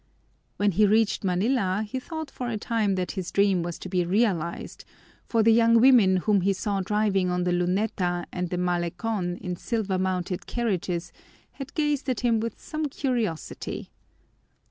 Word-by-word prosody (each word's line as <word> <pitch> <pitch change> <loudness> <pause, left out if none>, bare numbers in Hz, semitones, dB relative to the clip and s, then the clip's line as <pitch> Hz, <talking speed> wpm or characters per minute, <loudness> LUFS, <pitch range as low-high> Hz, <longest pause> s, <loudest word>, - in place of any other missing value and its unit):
When 205 0 +2
he 210 +4 +4
reached 215 +1 +2
Manila 195 +2 +1
he 260 +5 -3
thought 315 +1 -6
for 250 -1 -4
a 225 - -2
time 215 -2 0
that 180 -1 -2
his 185 -4 -4
dream 200 -3 +3
was 170 0 -4
to - - -8
be 180 -1 +1
realized, 180 -3 -1 0.4
for 225 -2 +2
the 225 +1 +6
young 230 0 +5
women 230 -7 +6
whom 200 +1 +2
he 195 +2 +2
saw 200 0 -2
driving 195 -2 +1
on 180 0 0
the 180 - 0
Luneta 180 0 0
and 180 -1 -2
the 180 - -2
Malecon 175 +2 -1
in 180 0 -4
silver 200 -1 -2
mounted 185 0 -2
carriages 180 -7 -2 0.4
had 275 0 -9
gazed 295 -3 0
at 250 - -1
him 235 -2 +2
with 230 +1 -4
some 310 -1 -3
curiosity. 240 - -3
200 Hz, 165 wpm, -26 LUFS, 180-230 Hz, 0.4 s, the